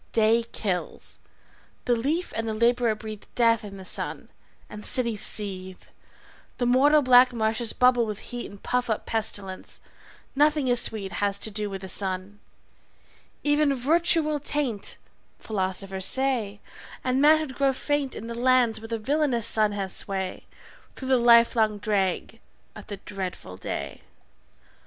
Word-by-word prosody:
Day 225 +1 +3
kills. 185 -4 -4 0.7
The 245 - +2
leaf 290 +10 -1
and 225 0 -2
the 215 - -2
laborer 235 0 +2
breathe 215 -1 -9
Death 230 -2 +3
in 200 -1 -9
the 190 - -10
sun, - - -2 0.4
the 210 - -9
cities 235 -3 0
seethe, 190 -3 -2 0.7
The 245 - 0
mortal 285 +5 +4
black 250 0 +6
marshes 220 0 -1
bubble 250 -2 +3
with 210 -2 -4 0.2
heat 245 - -5
And 200 - -14
puff 250 -1 -1
up 220 - -2
pestilence; 205 -4 -4 0.6
nothing 295 -1 +3
is 245 -1 +4
sweet 200 -4 -1
Has 200 +3 -1
to 220 - -3
do 210 0 -2
with 195 -1 -6
the 190 - -7
sun: 190 +1 -2 1.0
even 290 -1 +2
virtue 325 +5 +2
will 300 -1 -1
taint 275 -7 -2 0.4
(Philosophers 190 -2 -3
say) 250 -7 0 0.4
and 255 +1 +1
manhood 310 -2 +4
grow 275 +1 +2
faint 285 0 -2
In 220 - -7
the 235 - -5
lands 240 -2 +2
where 225 - -8
the 230 0 -2
villainous 260 -1 +1
sun 215 -2 +3
has 195 -2 -4
sway 190 -2 -3 0.5
Through 260 - -6
the 260 - +5
livelong 235 -2 +4
drag 205 +1 -1 0.4
of - - -11
the 205 - -6
dreadful 190 - -7
day. 95 - -6
225 Hz, 150 wpm, -25 LUFS, 205-255 Hz, 1.0 s, black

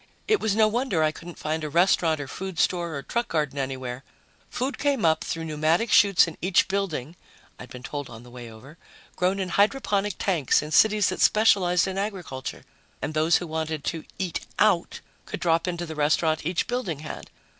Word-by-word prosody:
It 430 -2 +3
was 210 -2 0
no 220 0 +5
wonder 215 -7 0
I 155 - +2
couldn't 170 +2 -11
find 155 +1 -3
a 155 - -3
restaurant 170 -1 +3
or 145 - -5
food 190 +3 -6
store 170 -3 0
or 140 - -5
truck 235 +9 -2
garden 150 -3 -1
anywhere 130 -1 -4 0.5
food 260 +3 -3
came 280 -8 +1
up 160 -1 +3
through 165 0 -4
pneumatic 160 +8 +1
chutes 200 -4 +6
in 165 - -9
each 180 0 +3
building, 175 -7 -3 0.4
I'd 125 - -10
been 125 0 -10
told 145 -1 -5
on 115 0 -11
the 125 - -14
way 120 -1 -9
over, 135 +9 -14 0.4
grown 185 +2 0
in 185 -1 -2
hydroponic 205 -1 +1
tanks 165 -10 +1
in 150 - -7
cities 210 +5 +4
that 185 - -3
specialized 190 -5 +4
in 190 0 -3
agriculture, 185 -11 -5 0.3
and 155 - -4
those 155 +2 +3
who 175 - -5
wanted 160 -2 -3
to 165 -2 -3
eat 185 -3 -2 0.2
"out" 195 -5 +2 0.3
could - - -5
drop 165 0 +1
into 175 -1 -3
the 160 - -6
restaurant 155 +1 +1
each 175 0 0
building 210 - -3
had. 155 - -8
170 Hz, 195 wpm, -25 LUFS, 155-195 Hz, 0.5 s, chutes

